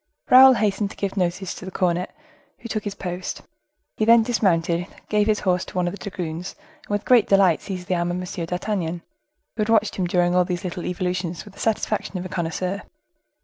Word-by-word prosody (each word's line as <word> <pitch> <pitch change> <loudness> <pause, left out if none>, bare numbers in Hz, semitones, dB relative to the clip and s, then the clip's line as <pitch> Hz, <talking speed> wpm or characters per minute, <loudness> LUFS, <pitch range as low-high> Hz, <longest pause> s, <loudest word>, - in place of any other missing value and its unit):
Raoul 260 +1 +10
hastened 205 -2 0
to - - -12
give 200 -1 -3
notice 185 0 -1
to - - -10
the 185 - -6
cornet, 180 -1 0 0.5
who - - -9
took 215 -2 -3
his 200 -1 -4
post; 180 -1 -5 0.5
he - - 0
then 230 +1 +6
dismounted, 175 -7 +1 0.2
gave 210 0 +2
his 215 -1 +1
horse 180 -1 +1
to - - -12
one 180 -1 +1
of - - -1
the 205 - -8
dragoons, 175 0 -5 0.3
and - - -28
with 205 0 -1
great 245 -4 +5
delight 195 -4 +4
seized 180 -3 -6
the 185 - 0
arm 175 0 0
of 175 - -2
M. 180 -2 -4
d'Artagnan, 180 -2 -2 0.5
who 220 - -2
had 215 - 0
watched 220 -2 +2
him 185 -2 0
during 175 0 +2
all 180 0 +4
these 175 -1 -3
little 180 -1 -4
evolutions 180 -1 -3
with 205 - -13
the - - -16
satisfaction 215 -3 -1
of 180 - -5
a - - -6
connoisseur. 180 +3 -2
185 Hz, 215 wpm, -23 LUFS, 175-205 Hz, 0.5 s, Raoul